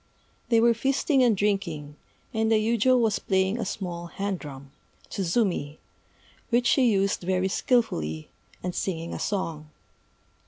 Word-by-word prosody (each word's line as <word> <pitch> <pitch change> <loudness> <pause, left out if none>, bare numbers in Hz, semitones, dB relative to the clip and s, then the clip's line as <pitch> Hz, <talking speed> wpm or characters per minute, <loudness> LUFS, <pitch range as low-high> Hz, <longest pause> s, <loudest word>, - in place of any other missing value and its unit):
They 230 -2 +5
were 235 +1 +5
feasting 270 +3 +1
and 235 -5 +4
drinking; 170 -8 -1 0.4
and 220 0 +1
the - - +5
yujô 235 +3 +3
was 220 -3 +2
playing 190 +3 +1
a - - -2
small 175 -3 -5
hand 195 +1 -3
drum 140 -2 -10 0.4
(tsuzumi), 175 -6 0 0.7
which 240 0 +2
she 255 -1 +4
used 195 0 +1
very 185 +1 0
skilfully, 80 - 0 0.3
and 180 0 -2
singing 170 -3 -3
a - - -5
song. 165 -7 -3
195 Hz, 135 wpm, -26 LUFS, 170-230 Hz, 0.7 s, They